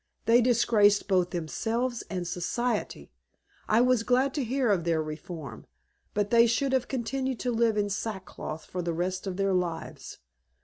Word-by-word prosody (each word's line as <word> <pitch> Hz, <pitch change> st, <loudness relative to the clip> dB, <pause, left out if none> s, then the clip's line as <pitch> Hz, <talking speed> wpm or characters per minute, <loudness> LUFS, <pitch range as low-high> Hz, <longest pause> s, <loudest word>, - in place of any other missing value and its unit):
"They 235 Hz, +2 st, +5 dB
disgraced 220 Hz, -4 st, +3 dB
both 185 Hz, -3 st, +2 dB
themselves 230 Hz, +9 st, -2 dB
and 180 Hz, -3 st, -3 dB
Society. 220 Hz, +6 st, -2 dB, 0.6 s
I 220 Hz, +2 st, +5 dB
was 250 Hz, -2 st, +3 dB
glad 255 Hz, +3 st, +2 dB
to 290 Hz, -, -1 dB
hear 250 Hz, -1 st, +1 dB
of 180 Hz, -4 st, +1 dB
their 165 Hz, -1 st, +1 dB
reform, 155 Hz, 0 st, -7 dB, 0.5 s
but 205 Hz, 0 st, 0 dB
they 235 Hz, 0 st, +6 dB
should 265 Hz, +4 st, 0 dB
have 255 Hz, -2 st, +1 dB
continued 260 Hz, 0 st, -2 dB
to 250 Hz, -, -1 dB
live 230 Hz, -2 st, +2 dB
in 205 Hz, -1 st, +1 dB
sackcloth 190 Hz, -6 st, -5 dB
for 180 Hz, -, -4 dB
the 170 Hz, -1 st, -2 dB
rest 185 Hz, +3 st, -2 dB
of 185 Hz, -1 st, -4 dB
their 195 Hz, -1 st, +1 dB
lives. 175 Hz, -3 st, -3 dB
210 Hz, 165 wpm, -28 LUFS, 180-245 Hz, 0.6 s, they